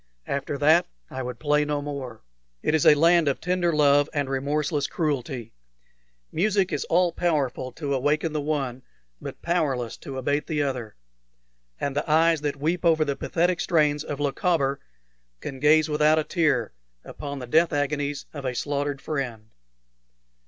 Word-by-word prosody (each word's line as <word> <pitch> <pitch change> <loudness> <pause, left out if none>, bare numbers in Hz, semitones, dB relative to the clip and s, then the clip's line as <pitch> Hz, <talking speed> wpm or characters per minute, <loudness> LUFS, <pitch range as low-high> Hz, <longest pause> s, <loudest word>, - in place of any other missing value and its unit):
After 140 +1 -3
that 155 +5 +4 0.2
I 130 - -4
would 125 -1 -5
play 150 +4 +2
no 150 0 -1
more. 140 - -6 0.4
It - - +1
is 160 - +3
a 150 - +8
land 165 +1 +4
of 140 - +1
tender 180 -1 0
love 145 -1 +4
and 145 -2 0
remorseless 145 +2 -1
cruelty. 135 -7 -3 0.8
Music 195 +1 +1
is - - -1
all 175 +1 +2
powerful 145 -7 -1
to 145 -3 -3
awaken 150 +4 0
the 150 - -1
one, 140 -4 -2 0.4
but - - -8
powerless 140 -9 -1
to 135 -1 -8
abate 145 +3 -1
the 150 -3 0
other; 125 -6 -4 0.8
and 140 -1 -2
the 145 - -2
eyes 160 0 +4
that 145 -2 -1
weep 160 +6 -1
over 160 -2 +4
the 140 -1 -1
pathetic 175 +3 0
strains 150 -3 +2
of 145 - -5
"Lochaber" 140 -1 0 0.6
can 135 - -7
gaze 155 +2 +5
without 150 +1 +3
a 155 - +2
tear 150 - 0 0.3
upon 140 -1 -7
the 130 - -6
death 160 +7 +3
agonies 145 -1 -1
of 145 -3 -7
a 130 -2 -2
slaughtered 145 +1 -2
friend. 120 -7 -4
145 Hz, 160 wpm, -25 LUFS, 135-155 Hz, 0.8 s, a